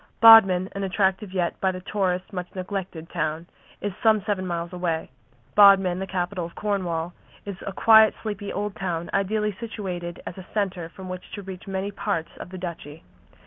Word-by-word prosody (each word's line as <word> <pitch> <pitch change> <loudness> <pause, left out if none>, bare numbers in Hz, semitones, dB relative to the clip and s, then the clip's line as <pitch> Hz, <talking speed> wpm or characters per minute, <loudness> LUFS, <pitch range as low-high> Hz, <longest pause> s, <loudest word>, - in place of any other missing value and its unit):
Bodmin, 195 -5 +8
an 200 - -4
attractive 190 +1 0
yet 180 -3 -2
by 190 - +2
the 185 - -6
tourist 185 -1 -2
much 180 -1 -4
neglected 185 -3 -5
town, 160 -1 -2 0.4
is 205 -2 -3
some 215 -3 +4
seven 190 -3 -1
miles 170 0 -3
away. 170 -4 -2 0.4
Bodmin, 195 -3 +6
the 190 - -4
capital 180 -1 -2
of 170 - -8
Cornwall, 180 -5 -2 0.3
is 200 -2 -6
a - - -2
quiet, 220 +1 +6
sleepy 205 -2 -4
old 205 0 -3
town 175 -3 -3
ideally 210 +1 0
situated 185 -7 -5
as 185 - -7
a 185 - -11
centre 185 -5 -1
from 185 +2 -10
which 185 0 -7
to 205 - -6
reach 190 0 -9
many 195 +1 -3
parts 195 -5 -3
of - - -8
the 185 - -8
Duchy. 165 -4 -7
190 Hz, 180 wpm, -25 LUFS, 175-200 Hz, 0.4 s, Bodmin